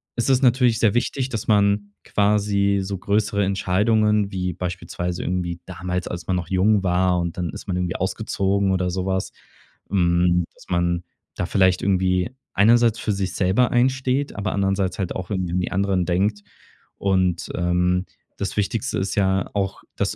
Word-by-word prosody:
es 120 +2 0
ist 130 0 +3
natürlich 125 -2 +4
sehr 105 -3 +3
wichtig, 130 +2 -1
dass 110 -4 -4
man 100 -1 +2
quasi 100 -1 +1
so 100 0 -4
größere 100 +1 0
Entscheidungen 105 +2 +2
wie 90 -2 -2
beispielsweise 90 0 -4
irgendwie 85 -1 -2
damals, 90 0 -4
als 85 -1 -6
man 95 - +1
noch 85 -2 -3
jung 95 +2 +3
war 90 0 +2
und 85 0 -3
dann 90 -2 -2
ist - - -10
man 90 -2 -1
irgendwie 90 -1 -2
ausgezogen 100 0 0
oder 90 -1 0
so 95 +1 -2
was 95 -1 -1 0.6
hm, 90 -2 +2
dass - - -18
man 85 0 0 0.3
da 90 - -2
vielleicht 95 -1 +2
irgendwie 95 +2 +1 0.2
einerseits 115 +2 +4
für 110 - -1
sich 95 -2 -2
selber 100 +7 +2
einsteht, 130 +2 +1
aber 100 -1 -2
andererseits 95 0 0
halt 95 - -2
auch 90 -2 -5
irgendwie 95 -4 -2
an 90 - +1
die - - -3
anderen 95 -2 +1
denkt. 100 +4 0 0.5
Und, 95 -4 0
ähm, 90 +1 +1 0.3
das 100 - -3
Wichtigste 110 +4 -1
ist 95 - -2
ja 95 -2 +1
auch, 100 -2 -2 0.2
dass - - -1
95 Hz, 170 wpm, -22 LUFS, 90-105 Hz, 0.6 s, natürlich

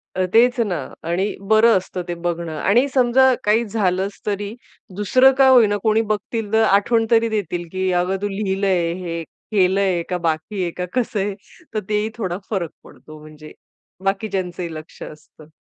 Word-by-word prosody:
अ, 185 0 +1
तेच 245 +3 +4
ना 195 -8 0 0.3
आणि 185 +5 -1
बरं 220 0 +5
असतं 185 0 -5
ते 175 - -2
बघणं. 170 -1 -2
आणि 240 - +3
समजा 260 0 +4
काही 220 +3 +2
झालंच 195 -2 -1
तरी 205 0 -3 0.4
दुसरं 255 +7 +4
काय 265 -1 +6
होई 245 -4 +7
ना, 205 - 0
कोणी 220 0 +3
बघतील 215 0 -3
तर 220 0 +4
आठवण 225 +2 +3
तरी 230 0 +4
देतील, 175 -5 -3
की 185 0 -1
अगं 180 +1 +1
तू 205 - 0
लिहिलंय, 195 -3 0
हे 170 -2 -5
केलंय, 190 -1 0
का 180 - -1
बाकी 170 +4 -2
आहे? 175 - -2
का 180 +2 -4
कसं 240 -4 -1
आहे? 195 0 -2 0.4
तर 215 - 0
तेही 210 +1 0
थोडा 185 -5 -3
फरक 185 -6 -2
पडतो. 155 0 -14
म्हणजे 155 0 -13 0.5
बाकीच्यांचंही 190 -4 -2
लक्ष 155 0 -11
असतं. 150 0 -13
195 Hz, 170 wpm, -20 LUFS, 180-220 Hz, 0.5 s, होई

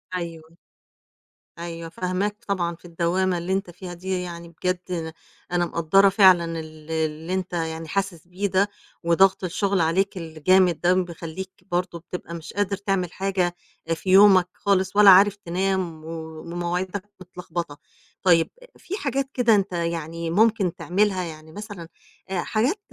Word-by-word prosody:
أيوه. 165 -2 -6 1.0
أيوه، 170 -1 -6
فاهماك 185 +4 -2
طبعًا 175 -4 -1
في 165 - -20
الدوّامة 175 +2 0
اللي 175 +2 -2
أنت 195 -1 -1
فيها 180 +1 -8
دي، 185 +1 -3
يعني 170 -1 -7
بجد 175 -1 -3 0.4
أنا 175 0 +2
مقدّرة 170 +4 +4
فعلًا 185 -3 +6
ال 155 0 -10
اللي 160 +2 -2
أنت 185 -1 -3
يعني 160 -1 -3
حاسس 185 -2 -3
بيه 185 +3 -2
ده 195 +2 +2 0.3
وضَغْط 190 +3 +4
الشُغل 190 +1 0
عليك 190 +5 +1
الجامد 170 +2 +2
ده 175 +1 +4
بيخلّيك 180 0 -4 0.2
برضه 175 -1 -1
بتبقى 175 0 -8
مش 165 -2 -8
قادر 200 -1 0
تعمل 195 -3 -1
حاجة 185 -2 -1 0.3
آآ - - +3
في 175 +3 -5
يومك 190 -1 +7
خالص 195 -1 0
ولا 205 -1 +8
عارف 195 +2 +7
تنام 185 -3 -2
و - - -8 0.3
ومواعيدك 175 +3 -3 0.2
متلخبطة. 170 -4 -6 0.5
طيب، 170 -3 +4 0.3
في 390 - -5
حاجات 275 - -1
كده 235 -3 +4
أنت 200 -1 0
يعني 165 -1 -3
ممكن 200 -1 +2
تعملها، 190 +1 +1
يعني 155 -2 -9
مثلًا 205 -2 -8 0.4
آآ 190 -2 -1
حاجات 250 - 0
180 Hz, 145 wpm, -24 LUFS, 170-195 Hz, 1.0 s, ولا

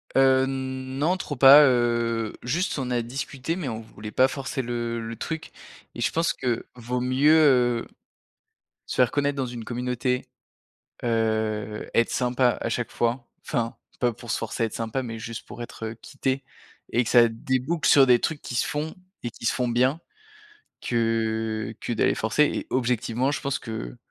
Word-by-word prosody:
Heu, 130 0 +5
non, 130 +5 -2
trop 150 -5 -5
pas, 140 +3 +9
heu, 120 -3 +1
juste, 155 +4 -1
on 125 -1 -3
a 120 -1 +1
discuté 135 +5 -4
mais 175 -7 -4
on 115 -1 -5
voulait 105 -1 -10
pas 130 +4 +4
forcer 135 0 -4
le 120 -1 -2
le 115 - -5
truc 160 +6 -5 0.4
et 120 - -7
je - - +1
pense 165 +1 +1
que 125 -3 -2
vaut 125 +1 -3
mieux, 130 +4 +3
heu, 125 -6 +4 1.0
se - - -4
faire 125 -2 +4
connaître 145 -1 0
dans 135 - 0
une 120 -2 -6
communauté, 125 +1 -2 0.8
heu, 110 -2 -1
être 115 - +3
sympa 125 0 +1
à - - -1
chaque 125 - -2
fois, 120 +1 -1 0.2
enfin, 120 -4 -1 0.2
pas 120 -1 +2
pour 115 +1 -10
se - - 0
forcer 115 - -2
à - - +2
être 110 - -8
sympa 115 +3 -2
mais 115 -2 -5
juste 115 0 -7
pour 120 - -8
être 115 -1 -6
quitté 135 -1 -2 0.5
et 120 - +2
que - - -3
ça 120 -2 +7
débouque 130 +7 -1
sur 135 -2 +7
des 125 -1 +6
trucs 160 -3 -2
qui 125 - -5
se - - +1
font 150 +2 -3 0.3
et 120 - -3
qui 115 - -14
se - - +3
font 125 -1 0
bien 130 +6 +2 0.8
que 110 -1 -1
que - - -2
d'aller 115 - +2
forcer 110 +7 +2
et - - -4
objectivement, 125 0 0
je - - -3
pense 140 0 -1
qu'il 110 - -6
125 Hz, 180 wpm, -25 LUFS, 115-135 Hz, 1.0 s, pas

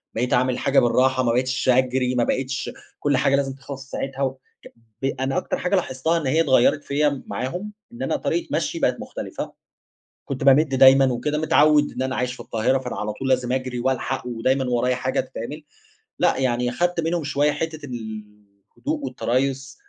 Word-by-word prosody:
بقيت 125 +2 0
اعمل 125 +1 +3
الحاجة 135 +2 +2
بالراحه، 130 +1 +3
ما 120 - +2
بقتش 130 +1 0
أجري، 125 0 +2
ما 120 - +3
بقتش 135 +2 -2 0.3
كل 145 -2 +1
حاجة 135 +1 +3
لازم 135 -1 0
تخلص 135 0 -8
في 135 - -21
ساعتها. 135 0 -4
وك 135 -1 -1 0.6
ب - - -2
أنا 135 0 -1
أكتر - - -1
حاجة 180 +3 0
لاحظتها 160 -1 0
إن 160 -5 -2
هي 155 +5 +3
اتغيرت 140 0 +3
فيَّ 145 -1 0
معاهم، 180 +11 -4 0.2
إن 235 - -10
أنا - - 0
طريقة 345 - -1
مَشيي - - -1
بقت - - +1
مختلفة. - - -6 0.7
كنت 135 -2 -4
بامد 140 +1 +5
دايمًا 135 +1 +7
وكده 150 +5 -1
متعوّد 150 -1 +4
إن 130 - -5
أنا 130 0 -1
عايش 125 0 -1
في - - -13
القاهرة، 115 +4 0
فأنا 125 -2 -5
على 105 0 -3
طول 135 +5 -4
لازم 125 -1 +1
أجري 130 -1 -2
وألحق 130 0 -1
ودايمًا 130 +3 0
ورايَ 125 +1 +1
حاجة 130 +1 -1
تتعمل. 145 +5 -5 0.6
لأ - - +2
يعني 125 -2 +1
خدت 175 +3 0
منهم 165 0 -1
شويّة 145 +1 +1
حتّة 155 0 -4
الهدوء 110 - -7
والتريث، 135 +2 -1
130 Hz, 180 wpm, -23 LUFS, 125-145 Hz, 0.7 s, دايمًا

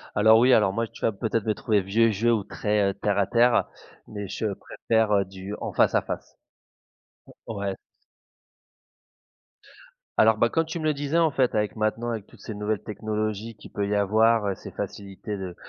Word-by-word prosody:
Alors 110 +2 +6
oui, 125 +2 +5
alors 100 -4 +4
moi 115 +1 -1
tu - - -16
vas - - +2
peut-être 110 +1 -2
me 110 - +1
trouver 105 -2 +1
vieux 110 +4 +2
jeu 110 +4 +1
ou 110 -3 0
très 105 0 0
heu, - - -2
terre 100 0 -1
à 100 - +3
terre, 120 +3 +3 0.4
mais 105 -1 -6
je 105 +3 -4
préfère 110 +2 -1
heu, 100 -1 +3
du 95 +1 -8
en - - -3
face - - +3
à - - +4
face. - - -7 1.1
Mmh. - - -5
Ouais. 100 -1 -3 2.4
Alors, 110 0 +5
bah, 115 +2 +3
comme 165 +5 +1
tu 160 +1 -5
me 155 - -5
le 155 - +2
disais, 145 +3 -1
en 165 -2 +3
fait, 130 -4 +1
avec 105 -1 0
maintenant, 110 +2 -1
avec 110 -3 -4
toutes - - -18
ces 110 - -6
nouvelles 105 0 -2
technologies 110 +1 -3
qu'il - - -14
peut 100 - -2
il 100 - -3
y - - +2
avoir 110 +2 +3
heu, 95 - -1
ces - - -10
facilités 100 +1 -6
de 95 -2 -6
110 Hz, 205 wpm, -25 LUFS, 100-115 Hz, 2.4 s, Alors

